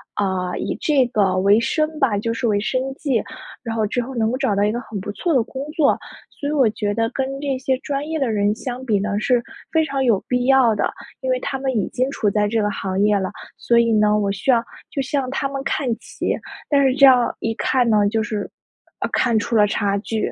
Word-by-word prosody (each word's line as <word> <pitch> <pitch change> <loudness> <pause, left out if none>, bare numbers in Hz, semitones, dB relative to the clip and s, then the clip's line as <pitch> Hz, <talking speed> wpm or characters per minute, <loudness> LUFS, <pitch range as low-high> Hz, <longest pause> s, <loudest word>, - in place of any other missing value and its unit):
啊， 185 -3 -1
以 - - -3
这 280 -5 +3
个 195 -6 +1
为 200 +3 +4
生 305 +4 -1
吧， 225 -7 +2
就 230 +3 -1
是 235 +1 -1
为 205 -2 +2
生 255 +5 -1
计， 265 -7 0 0.4
然 230 -2 -4
后 220 -1 +1
之 245 +4 -1
后 260 +2 -7
能 225 0 +1
够 255 - -1
找 265 -7 0
到 200 - +2
一 210 - +2
个 240 - -2
很 215 -3 -6
不 205 +2 -5
错 340 - -2
的 255 -6 +3
工 265 +3 -6
作， 305 -4 +3 0.4
所 285 - -5
以 - - -1
我 270 -6 +3
觉 205 -1 -2
得 225 +1 0
跟 270 0 -3
这 275 -2 -1
些 260 0 0
专 285 +2 -3
业 320 - -1
的 265 -5 0
人 205 0 +2
相 250 +1 -6
比 210 -5 +2
呢， 205 0 -1
是 245 +2 +2 0.3
非 320 -1 +2
常 275 -3 -1
有 230 -6 +3
必 250 0 0
要 265 -5 +5
的。 - - 0 0.3
因 260 - -3
为 255 - +1
他 270 - -3
们 265 -1 -1
已 200 - 0
经 255 +2 -1
处 210 -6 0
在 210 +1 +1
这 225 +1 0
个 205 - +1
行 190 -1 -3
业 210 0 +4
了， 190 - -2 0.3
所 235 0 +3
以 230 -1 +3
呢， 210 0 +3
我 200 -1 0
需 200 +7 +1
要 235 -2 +4 0.3
就 275 - -1
向 265 -1 -1
他 275 - -1
们 275 0 -4
看 275 -1 -1
齐， - - -3 0.3
但 280 -2 +4
是 260 - +3
这 275 0 +7
样 250 -2 +5
一 225 - -1
看 255 -2 +1
呢， 210 -2 +4
就 220 0 0
是， 210 -1 -4 0.5
呃， - - -2
看 235 -3 +2
出 230 - -2
了 210 -1 +6
差 200 -1 0
距。 215 +1 -2
235 Hz, 265 characters per minute, -21 LUFS, 210-265 Hz, 0.5 s, 这